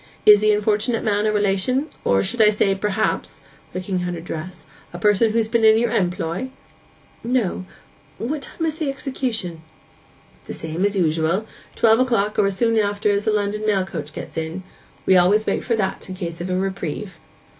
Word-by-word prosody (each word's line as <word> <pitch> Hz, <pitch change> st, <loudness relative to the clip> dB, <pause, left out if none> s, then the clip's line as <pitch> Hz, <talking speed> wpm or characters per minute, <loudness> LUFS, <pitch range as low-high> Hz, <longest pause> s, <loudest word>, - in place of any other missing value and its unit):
Is 210 Hz, -1 st, +9 dB
the 215 Hz, 0 st, +3 dB
unfortunate 210 Hz, +2 st, +1 dB
man 210 Hz, 0 st, +1 dB
a -, -, +2 dB
relation; 210 Hz, +7 st, +1 dB, 0.2 s
or, 100 Hz, -, +3 dB
I -, -, +3 dB
should 220 Hz, -3 st, +3 dB
say, 200 Hz, -1 st, +2 dB
perhaps' 210 Hz, +2 st, -2 dB, 0.3 s
(looking 185 Hz, 0 st, -3 dB
at 180 Hz, 0 st, -3 dB
her -, -, -6 dB
dress) 170 Hz, +2 st, -7 dB, 0.3 s
'a -, -, -5 dB
person 210 Hz, +3 st, +3 dB
who's 225 Hz, 0 st, +1 dB
been 230 Hz, 0 st, +1 dB
in 220 Hz, 0 st, +7 dB
your 235 Hz, 0 st, +1 dB
employ?' 180 Hz, +4 st, -1 dB, 0.7 s
'No. 235 Hz, -7 st, -1 dB, 0.5 s
What 280 Hz, +6 st, -3 dB
time 330 Hz, -, -4 dB
is 315 Hz, -1 st, -2 dB
the 310 Hz, -3 st, -1 dB
execution?' 250 Hz, -, -3 dB, 0.8 s
'The -, -, -6 dB
same 160 Hz, +4 st, -3 dB
as 205 Hz, 0 st, 0 dB
usual—twelve 185 Hz, +7 st, +1 dB
o'clock, 230 Hz, -5 st, +1 dB
or 200 Hz, -, +4 dB
as 195 Hz, -1 st, -2 dB
soon 230 Hz, 0 st, +2 dB
after 205 Hz, 0 st, +1 dB
as 200 Hz, 0 st, 0 dB
the 220 Hz, -, +2 dB
London 210 Hz, 0 st, -1 dB
mail 200 Hz, -3 st, +1 dB
coach 155 Hz, -5 st, -6 dB
gets -, -, -8 dB
in. 160 Hz, +4 st, -5 dB, 0.4 s
We 190 Hz, -, +5 dB
always 200 Hz, +5 st, +4 dB
wait -, -, -1 dB
for 235 Hz, -, 0 dB
that, 195 Hz, -2 st, -3 dB
in 185 Hz, -, -5 dB
case 170 Hz, -3 st, -5 dB
of 180 Hz, -, -4 dB
a 185 Hz, -, 0 dB
reprieve. 190 Hz, -1 st, -4 dB
205 Hz, 185 wpm, -21 LUFS, 185-220 Hz, 0.8 s, Is